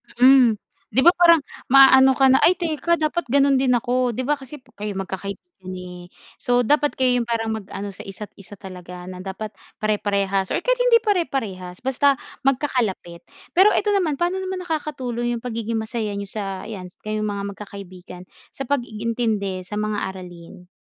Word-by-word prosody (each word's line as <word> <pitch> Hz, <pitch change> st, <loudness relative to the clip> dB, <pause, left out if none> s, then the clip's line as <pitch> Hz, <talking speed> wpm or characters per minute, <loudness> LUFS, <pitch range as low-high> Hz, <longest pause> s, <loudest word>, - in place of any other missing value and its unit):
Mm, 250 Hz, -2 st, +6 dB, 0.3 s
'di 260 Hz, -, +2 dB
ba 345 Hz, -, +8 dB
parang 335 Hz, -3 st, +6 dB, 0.2 s
maaano 265 Hz, 0 st, +7 dB
ka 265 Hz, -1 st, +5 dB
na, 265 Hz, -, +5 dB
"ay 365 Hz, -, +5 dB
teka, 340 Hz, 0 st, 0 dB
dapat 310 Hz, -1 st, -2 dB
gano'n 275 Hz, +1 st, +3 dB
din 255 Hz, -2 st, +3 dB
ako," 245 Hz, 0 st, 0 dB
'di 255 Hz, -, -2 dB
ba, 290 Hz, +2 st, 0 dB
kasi 270 Hz, +2 st, -10 dB, 0.2 s
kayo 210 Hz, -1 st, -4 dB
magkakaibigan 195 Hz, +1 st, -5 dB, 0.3 s
eh, 180 Hz, -1 st, -9 dB, 0.3 s
so 245 Hz, 0 st, +2 dB
dapat 295 Hz, +3 st, +2 dB
kayo 250 Hz, -1 st, +2 dB
'yung 235 Hz, -, -3 dB
parang 225 Hz, -1 st, -1 dB
mag-ano 200 Hz, -2 st, -5 dB
sa 190 Hz, -, -11 dB
isa't 200 Hz, +2 st, -8 dB
isa 200 Hz, +1 st, -12 dB
talaga 180 Hz, -1 st, -10 dB
na 185 Hz, 0 st, -8 dB
dapat 195 Hz, +3 st, -6 dB, 0.3 s
pare-parehas 200 Hz, -2 st, 0 dB
or -, -, -2 dB
kahit -, -, +1 dB
hindi 470 Hz, -2 st, +4 dB
pare-parehas, 225 Hz, -, -2 dB
basta 270 Hz, +2 st, +2 dB, 0.3 s
magkakalapit. 245 Hz, -, -1 dB, 0.3 s
Pero 385 Hz, +4 st, +5 dB
eto 415 Hz, 0 st, +1 dB
naman, 360 Hz, -7 st, +1 dB
pano 350 Hz, +5 st, -1 dB
naman 375 Hz, -1 st, -4 dB
nakakatulong 255 Hz, -7 st, -3 dB
'yung 230 Hz, -, -8 dB
pagiging 230 Hz, -2 st, -3 dB
masaya 220 Hz, -1 st, -3 dB
niyo 200 Hz, -1 st, -5 dB
sa 195 Hz, -3 st, -4 dB
ayan 195 Hz, -5 st, -7 dB, 0.2 s
kayong 215 Hz, 0 st, -2 dB
mga 200 Hz, -1 st, -3 dB
magkakaibigan 185 Hz, -3 st, -10 dB, 0.3 s
sa 270 Hz, -, -4 dB
pag-iintindi 225 Hz, -7 st, -2 dB
sa 210 Hz, -, -6 dB
mga 210 Hz, 0 st, -1 dB
aralin? 180 Hz, -2 st, -11 dB
230 Hz, 165 wpm, -22 LUFS, 200-275 Hz, 0.3 s, ba